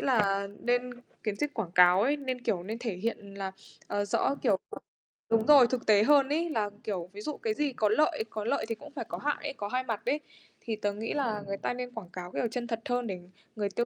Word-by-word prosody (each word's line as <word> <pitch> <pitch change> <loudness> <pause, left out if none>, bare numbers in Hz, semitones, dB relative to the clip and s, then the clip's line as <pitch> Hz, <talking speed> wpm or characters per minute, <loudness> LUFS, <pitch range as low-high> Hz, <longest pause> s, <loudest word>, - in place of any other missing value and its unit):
là 200 -6 +2
nên 245 +1 +1 0.3
kiến 210 -3 -1
thức 295 +6 -1
quảng 195 -7 -3
cáo 180 +1 +7
ấy, 280 +6 +3
nên, 260 -3 -3
kiểu, 200 -8 0
nên 215 +5 -5
thể 230 -6 -3
hiện 200 -1 -4
là, 195 -1 -4 0.3
ờ, 205 0 0
rõ, 205 +6 +1
kiểu 205 -7 +3 0.7
đúng 225 -1 +3
rồi, 280 -5 +9
thực 250 0 -2
tế 210 -1 +6
hơn 275 +2 +5
ấy. 330 +4 +1
Là, 215 -8 0
kiểu, 185 -6 -3
ví 205 - -7
dụ 300 - -4
cái 450 -3 -1
gì 295 -7 0
có 215 -3 +2
lợi 295 +1 +3
có 215 -1 -4
lợi 275 - +1
thì 225 - 0
cũng - - -12
phải 285 - -4
có - - -3
hại 295 0 0
ấy, - - -3
có 205 - -3
hai 255 +4 0
mặt 225 -4 -3
ấy, 295 - +1 0.4
thì 225 -3 -2
tớ 205 -1 -1
nghĩ 215 +2 -3
là 230 -8 0
người 195 0 -2
ta - - -1
nên 250 0 -5
quảng 215 -7 -7
cáo 180 -1 -6
kiểu 235 - 0
chân 240 0 -3
thật 230 -1 -2
hơn 245 -1 0
để 190 -3 -3 0.4
người 205 -2 -1
tiêu 235 +4 0
225 Hz, 250 wpm, -30 LUFS, 205-255 Hz, 0.7 s, rồi